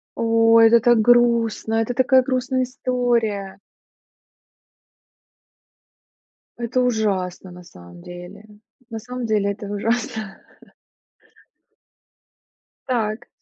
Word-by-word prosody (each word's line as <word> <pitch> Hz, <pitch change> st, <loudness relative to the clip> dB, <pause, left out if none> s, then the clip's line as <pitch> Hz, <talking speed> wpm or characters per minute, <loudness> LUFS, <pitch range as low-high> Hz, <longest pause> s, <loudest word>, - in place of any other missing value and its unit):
Ой, 225 Hz, 0 st, +4 dB
это 235 Hz, +1 st, +5 dB
так 240 Hz, 0 st, +3 dB
грустно. 235 Hz, -1 st, +2 dB
Это 225 Hz, +2 st, -1 dB
такая 260 Hz, +1 st, +3 dB
грустная 255 Hz, 0 st, -1 dB
история. 240 Hz, -6 st, -2 dB, 3.0 s
Это 240 Hz, +2 st, -1 dB
ужасно 195 Hz, -7 st, -2 dB
на 180 Hz, 0 st, -13 dB
самом 85 Hz, -, -15 dB
деле, 175 Hz, -, -11 dB, 0.4 s
на 225 Hz, -1 st, -6 dB
самом 250 Hz, +2 st, -7 dB
деле 210 Hz, -2 st, 0 dB
это 205 Hz, +1 st, -8 dB
ужасно. 220 Hz, 0 st, -3 dB, 2.5 s
Так. 230 Hz, -2 st, -2 dB
225 Hz, 85 wpm, -21 LUFS, 205-245 Hz, 3.0 s, это